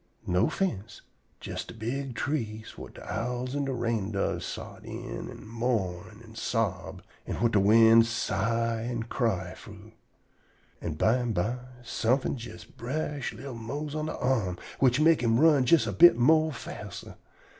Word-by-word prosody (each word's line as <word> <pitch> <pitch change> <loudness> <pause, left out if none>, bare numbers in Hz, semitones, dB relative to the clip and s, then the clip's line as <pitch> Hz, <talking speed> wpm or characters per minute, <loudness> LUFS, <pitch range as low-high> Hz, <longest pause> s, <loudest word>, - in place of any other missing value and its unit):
No 90 +1 +2
fince; 115 - -3 0.4
jes - - -4
de - - -11
big 125 +3 -4
trees 110 -7 -3
whut - - -11
de - - -11
owls 125 +3 -3
an' 145 -1 0
de 135 - -2
rain 115 -5 -1
doves 100 - -1
sot - - -8
in - - -6
an' - - -11
mourn 110 -4 -2
an' 110 -1 -14
sob, 110 -5 -2 0.2
an' - - -2
whut 115 -1 +1
de 105 - +4
wind 115 +3 +6
sigh 115 +1 0
an' 120 0 -3
cry 110 -7 -1
frough. - - -13 0.9
An' 80 - -3
bimeby 115 +2 +1 0.2
somefin' 120 +4 0
jes 115 -8 -9
brush 140 +2 -4
li'l 135 +1 -8
Mose 140 +6 -5
on 155 0 -2
de - - -4
arm, 110 -9 0 0.2
which 130 0 +4
mek 160 -1 +5
him 115 -1 +3
run 150 -4 +5
jest 165 +4 +5
a - - -2
bit 175 -6 +7
more 155 +5 +4
faster. 130 - -8
115 Hz, 155 wpm, -28 LUFS, 110-135 Hz, 0.9 s, bit